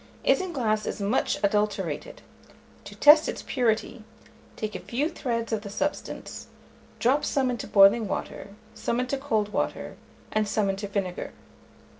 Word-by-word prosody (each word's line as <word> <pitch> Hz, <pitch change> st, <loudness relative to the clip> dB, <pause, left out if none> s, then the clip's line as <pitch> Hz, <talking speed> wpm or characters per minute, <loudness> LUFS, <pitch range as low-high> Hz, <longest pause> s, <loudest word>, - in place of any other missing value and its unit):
Isinglass 245 Hz, -, +1 dB
is -, -, -3 dB
much 205 Hz, +5 st, 0 dB
adulterated: 210 Hz, +1 st, -1 dB, 0.6 s
to -, -, -10 dB
test 300 Hz, +1 st, +7 dB
its -, -, -5 dB
purity, 230 Hz, -2 st, 0 dB, 0.5 s
take 215 Hz, -1 st, -4 dB
a -, -, -4 dB
few 270 Hz, +6 st, -1 dB
threads 230 Hz, -7 st, -3 dB
of 215 Hz, -, 0 dB
the 205 Hz, -, -8 dB
substance, 290 Hz, +8 st, -4 dB, 0.5 s
drop 265 Hz, +5 st, +2 dB
some 265 Hz, -2 st, +1 dB
into 240 Hz, -4 st, -5 dB
boiling 205 Hz, +2 st, +6 dB
water, 200 Hz, +1 st, -5 dB, 0.2 s
some 235 Hz, -, -2 dB
into 255 Hz, +2 st, -1 dB
cold 220 Hz, -7 st, -1 dB
water, -, -, -2 dB, 0.3 s
and 215 Hz, -1 st, +1 dB
some 205 Hz, -1 st, +1 dB
into 195 Hz, +1 st, -5 dB
vinegar. 195 Hz, -3 st, -3 dB
220 Hz, 140 wpm, -26 LUFS, 205-255 Hz, 0.6 s, test